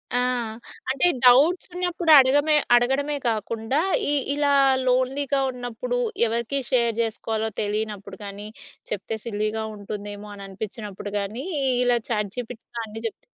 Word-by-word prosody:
ఆ! - - +4 0.7
అంటే 275 +6 +2 0.2
డౌబ్ట్స్ 290 +10 +5
ఉన్నప్పుడు 355 -2 0
అడగ‌మే 290 +3 +5 0.2
అడగడమే 275 +4 +1
కాకుండా 225 +4 -1 0.3
ఈ - - +2 0.2
ఇలా 290 -1 +2 0.4
లోన్‌లీగా 270 +2 +1
ఉన్నప్పుడు, 245 0 -4 0.3
ఎవరికి 235 +4 -1
షేర్ 235 -3 +2
జేసుకోవాలో 220 0 -2
తెలియనప్పుడు 205 -2 -4
గాని, 200 +1 -7 0.4
చెప్తే 210 +2 -3
సిల్లీ‌గా 215 0 -2
ఉంటుందేమో 205 0 -7
అని 200 0 -9
అనిపించినప్పుడు 205 0 -6
గాని, 215 +7 -4 0.4
ఇలా 245 -1 +3
చాట్ 210 -3 -1
జిపిటీతో 235 -1 -7
అన్ని 220 +1 -8
జేప్తే - - -11
230 Hz, 120 wpm, -24 LUFS, 210-260 Hz, 0.7 s, డౌబ్ట్స్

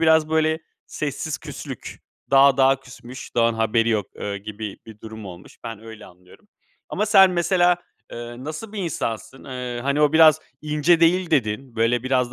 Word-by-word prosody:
biraz 160 -1 +4
böyle 160 0 +1 0.3
sessiz 145 0 -4
küslük, - - -8 0.3
dağ 135 -1 +6
dağa 135 0 +4
küsmüş 130 0 -11
dağın 115 -1 +3
haberi 115 +1 +1
yok, 105 -4 0
ııı, 100 0 -4
gibi 105 0 -7
bir 110 -1 -13
durum 110 -1 -9
olmuş. 90 -1 -12
Ben 115 -2 -7
öyle 110 -1 -11
anlıyorum. 90 - -19 0.4
Ama 210 +3 -1
sen 195 -3 +7
mesela, 175 0 +3 0.4
ııı, 120 +1 -8
nasıl 160 +9 -7
bir 210 - -6
insansın? 135 - -4
Iıı, 125 -2 -5
hani, 140 +3 0
o 150 0 +4
biraz 155 -1 +6 0.2
ince 155 +3 +2
değil 175 +1 +3
dedin, 125 -2 -1
böyle, 115 +2 +2
biraz 130 -2 0
130 Hz, 165 wpm, -22 LUFS, 115-160 Hz, 0.4 s, sen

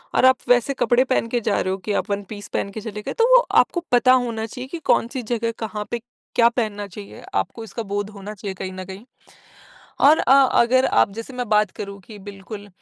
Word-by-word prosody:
और - - +4
आप 260 0 +6
वैसे 245 +2 +3
कपड़े 250 0 +3
पहन 255 -3 0
के 240 - 0
जा 210 -2 0
रहे 185 - -1
हो - - -3
कि 210 - -1
आप 205 - -1
वन 200 0 -1
पीस 205 -1 -8
पहन - - -1
के 220 - -7
चले 210 -1 -6
गए, - - -5
तो 460 - +3
वो - - +9 0.2
आपको 345 - -3
पता 250 +1 +5
होना 235 -3 0
चाहिए 250 +3 -8
कि 340 - -6
कौन-सी 250 +2 +1
जगह 230 0 -1
कहाँ 215 -2 -4
पे 235 - -1 0.4
क्या 235 -1 +6
पहनना 215 -4 -3
चाहिए, 200 +1 -11
आपको 230 - -2
इसका 225 +1 -6
बोध 205 0 -3
होना 205 0 -8
चाहिए 195 -1 -6
कहीं 185 0 -5
न 185 0 -7
कहीं। 190 +4 -10 1.0
और 310 +2 +7
अ, - - +2 0.3
अगर 255 +2 +3
आप 200 - +3
जैसे 230 +5 -8
मैं 250 -1 -4
बात 210 -2 +3
करूँ 200 0 -6
कि 210 +3 -12
बिल्कुल 205 +1 -9
220 Hz, 230 wpm, -22 LUFS, 205-245 Hz, 1.0 s, वो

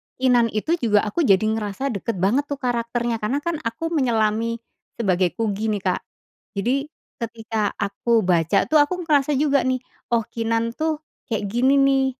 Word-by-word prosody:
Keenan 250 -2 +3
itu 320 +11 0
juga, 210 -5 +3
aku 280 +9 0
jadi 195 0 +5
ngerasa 220 +4 -1
dekat 220 +1 -3
banget 260 +9 +2
tuh 285 -1 -4
karakternya, 235 -2 -1
karena 245 +7 -1
kan 340 -3 -2
aku 230 +9 -3
menyelami 230 -5 +1 0.4
sebagai 185 -5 +1
Kugy 220 -1 -1
nih, 205 - -1
Kak. 185 -1 0 0.5
Jadi 260 +8 0 0.3
ketika 225 -2 -3
aku 220 +3 +1
baca 175 +1 +3
tuh 310 -1 +4
aku 355 +5 +1
ngerasa 295 -2 +2
juga 280 0 +3
nih, 255 0 +1 0.3
"Oh, 230 -1 +3
Keenan 230 0 -1
tuh 315 -1 -1 0.3
kayak 215 -2 0
gini 260 +4 +3
nih," 275 -1 +4
230 Hz, 160 wpm, -22 LUFS, 215-275 Hz, 0.5 s, jadi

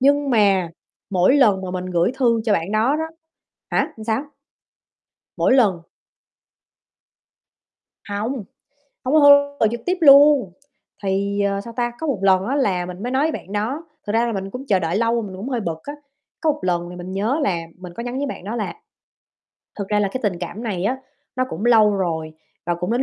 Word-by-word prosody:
nhưng 285 +1 +3
mà 195 -7 +3 0.4
mỗi 185 +8 +4
lần 210 -9 +4
mà 185 - -4
mình 185 0 -4
gửi 180 +5 +1
thư 235 -3 +3
cho 220 - +2
bạn 180 0 -1
đó 225 +7 +2
đó 320 - -2 0.7
hả, - - 0
sao? 225 +4 0 1.1
Mỗi - - +3
lần 200 -10 +3 2.3
Hông, 205 +4 -2 0.7
hông 255 - -1
có 310 - +6
thư, 285 0 +6
gọi 220 - +4
trực 235 0 -4
tiếp 365 +1 0
luôn. 280 - +7 0.5
Thì, 200 +1 0
ờ, 200 0 0
sao 230 +3 -10
ta, 240 0 -1
có 320 - -3
một 265 -9 -1
lần 190 -1 +3
á 270 - -1
là 190 -10 +1
mình 180 +3 -8
mới 245 - -3
nói 265 +3 +2
với 320 - +1
bạn 195 - -8
đó, 235 +10 -2 0.2
thật 205 - -2
ra 230 +1 +3
là 235 - -1
mình 195 -1 -4
cũng 250 +6 -7
chờ 195 -3 +3
đợi 170 +2 -1
lâu 230 +1 +1
rồi 235 -2 0
mình 190 -2 -7
cũng 200 +8 -6
hơi 245 -3 -1
bực 165 -5 -4
á, 290 - -6 0.5
có 315 - +3
một 300 - -7
lần 175 -1 -1
thì 180 - -9
mình 180 +1 -7
nhớ 220 +10 0
là 190 -11 +1 0.2
mình 180 -1 -10
có 235 - -6
nhắn 245 +1 -4
với 285 - -1
bạn 270 - -6
đó 210 +5 -4
là 220 -3 -3 1.1
"Thực 200 -1 -4
ra 210 0 +2
là 200 - +1
cái 255 - -3
tình 195 -5 -1
cảm 185 +6 -6
này 195 -5 -3
á 250 +5 +1 0.4
nó 255 - +1
cũng 195 - -5
lâu 220 -3 +5
rồi 160 -4 -2 0.3
và 175 - +1
cũng 180 +3 -4
đến 245 +2 +1
215 Hz, 215 wpm, -21 LUFS, 190-255 Hz, 2.3 s, luôn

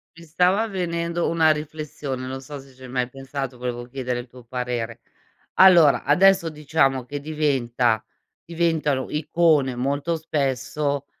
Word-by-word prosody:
Mi 170 0 -13
stava 180 +7 +2
venendo 170 -3 -2
una 165 -1 +3
riflessione. 150 -4 -3
Non 130 +1 -5
so 145 +1 -8
se 135 -1 -16
ci 130 - -16
hai - - -8
mai 125 0 -1
pensato, 135 -1 -6
volevo 120 -1 -4
chiedere 125 -1 -4
il 120 - -8
tuo 125 0 -15
parere. 120 -1 -4 0.6
Allora 175 -6 +6
adesso 185 +3 +4
diciamo 140 -3 +1
che 145 +2 -5
diventa 130 -7 0 0.4
diventano 160 -5 0
icone 150 -3 +2
molto 140 +6 -1
spesso, 140 -1 -2
140 Hz, 140 wpm, -23 LUFS, 130-160 Hz, 0.6 s, Allora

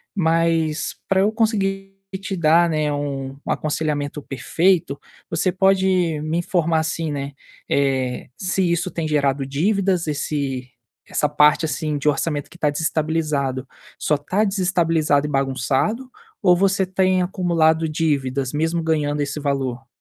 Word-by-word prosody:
Mas, 165 -2 +1
para 190 0 +3
eu 210 +2 +3
conseguir 195 -4 -1 0.2
te 195 0 -4
dar, 170 +1 +4
né, 155 -2 0
um 135 -2 -3
um - - -1
aconselhamento 150 -1 -2
perfeito, 160 +2 +1 0.3
você 170 +3 +1
pode 185 -3 +2
me 155 +2 -1
informar 170 -2 +1
assim, 160 0 -2
né, 140 -1 -4 0.4
eh, 130 -3 0
se 185 -2 0
isso 170 +2 0
tem 165 -3 -3
gerado 140 -2 +1
dívidas, 185 +4 0
esse 140 -3 -2 0.4
essa - - +1
parte 150 +2 +4
assim 155 -1 -2
de 145 +1 +1
orçamento 145 0 -1
que 175 - -15
tá 150 - +1
desestabilizado, 150 -3 -1 0.3
só 150 - +1
tá 185 +9 0
desestabilizado 165 -7 +1
e - - -5
bagunçado, 135 - 0 0.3
ou 180 -3 +5
você 195 +1 +2
tem 185 0 +2
acumulado 165 -4 +2
dívidas, 140 -4 -1
mesmo 165 +3 0
ganhando 150 -2 0
esse 145 +1 -3
valor? 135 -3 -2
160 Hz, 140 wpm, -21 LUFS, 145-180 Hz, 0.4 s, ou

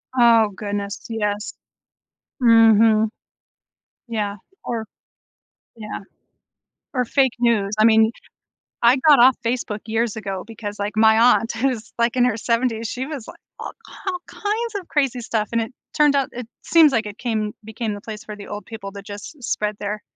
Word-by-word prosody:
Oh, 230 -3 +5
goodness, 205 0 -4
yes. 210 -2 -2 0.9
Mhm. 225 -1 +6 1.0
Yeah 210 -3 -2 0.3
or 230 -2 -3 0.9
yeah. 215 -2 -7 0.9
Or 250 -2 0
fake 265 0 +2
news, 225 -5 +2
I 215 - +5
mean, 220 0 +5 0.7
I 240 +2 +6
got 290 -4 +8
off 250 +1 +7
Facebook 230 -3 -2
years 225 0 0
ago 195 -4 -5
because, 210 -2 -7
like, 205 +1 -2
my 220 0 +5
aunt 230 -1 +4
who's, 235 -2 -2
like, 235 +1 +1
in 250 - +3
her 230 -3 +1
70s, 230 -1 0
she 255 +4 -4
was, 280 -6 -7
like, - - -12 0.2
all - - -6
k - - -19 0.2
all 365 -1 -1
kinds 435 +2 -3
of 365 - -14
crazy 275 -5 0
stuff, 220 -3 -2
and 230 - +1
it 225 +3 -5 0.2
turned 295 -1 +5
out 275 -1 +1
it 245 -2 -7 0.2
seems 315 -2 +6
like 230 -1 +1
it 210 0 -8
came 215 -4 -2
became 220 0 -4
the 205 - -6
place 215 -1 -8
for 210 - -8
the 200 - -10
old 205 0 -7
people 220 -3 -8
that 200 0 -10
just 205 +8 -9
spread 210 -2 -1
their, 210 +1 -4
225 Hz, 170 wpm, -21 LUFS, 210-245 Hz, 1.0 s, got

